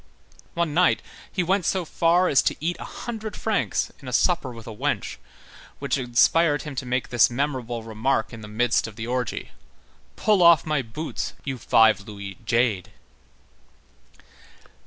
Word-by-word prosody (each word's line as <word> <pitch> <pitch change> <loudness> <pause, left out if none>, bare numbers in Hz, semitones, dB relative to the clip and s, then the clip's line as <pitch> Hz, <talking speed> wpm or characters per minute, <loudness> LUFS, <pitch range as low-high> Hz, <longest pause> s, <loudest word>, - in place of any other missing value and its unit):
One 170 -3 0
night, 180 +3 +3 0.3
he 185 - 0
went 190 +2 +1
so 185 +1 0
far 170 +3 +2
as 140 - +4
to - - 0
eat 170 +3 -1
a - - -6
"hundred 220 -3 -6
francs" 220 -2 -1
in 135 - -11
a - - -4
supper 145 0 +1
with 115 -2 -11
a 110 - -8
wench, - - -2 0.6
which - - -1
inspired 145 +5 +3
him 150 - -6
to 130 - -3
make 125 0 -1
this 120 -1 +4
memorable 125 -3 -3
remark 110 +2 -1
in 115 - -9
the 105 - -9
midst 115 +2 +1
of 110 - -10
the 110 0 -5
orgy: 125 -1 -3 0.6
"Pull 210 -4 +2
off 170 -3 +6
my 155 -3 0
boots, 130 +7 -5
you 135 -3 -4
five 110 -3 +4
louis 100 +1 -8
jade." 115 -5 +1
130 Hz, 160 wpm, -24 LUFS, 115-165 Hz, 0.6 s, off